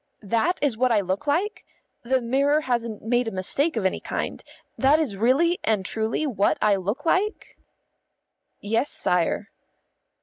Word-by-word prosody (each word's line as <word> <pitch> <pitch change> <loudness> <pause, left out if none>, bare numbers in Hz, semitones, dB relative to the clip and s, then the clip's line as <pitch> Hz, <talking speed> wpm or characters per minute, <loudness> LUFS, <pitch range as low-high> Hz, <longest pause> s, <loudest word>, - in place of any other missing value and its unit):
"That 230 - +1
is 275 -6 +2
what 255 +1 +2
I 215 -3 +3
look 190 +9 -3
like? 365 +9 0 0.4
The 260 +2 0
mirror 280 +5 +2
hasn't 235 -5 -2
made 240 +2 +1
a - - -2
mistake 275 - 0
of 205 - -1
any 190 - +1
kind? - - -4 0.3
That 280 +4 +4
is 275 -11 -1
really 270 - +2
and 210 -4 0
truly 220 +8 -1
what 215 -8 +1
I 210 -1 +3
look 200 - -3
like?" 390 +6 0 1.0
"Yes, 225 +7 0
sire." 180 +4 -1
240 Hz, 155 wpm, -24 LUFS, 210-290 Hz, 1.0 s, That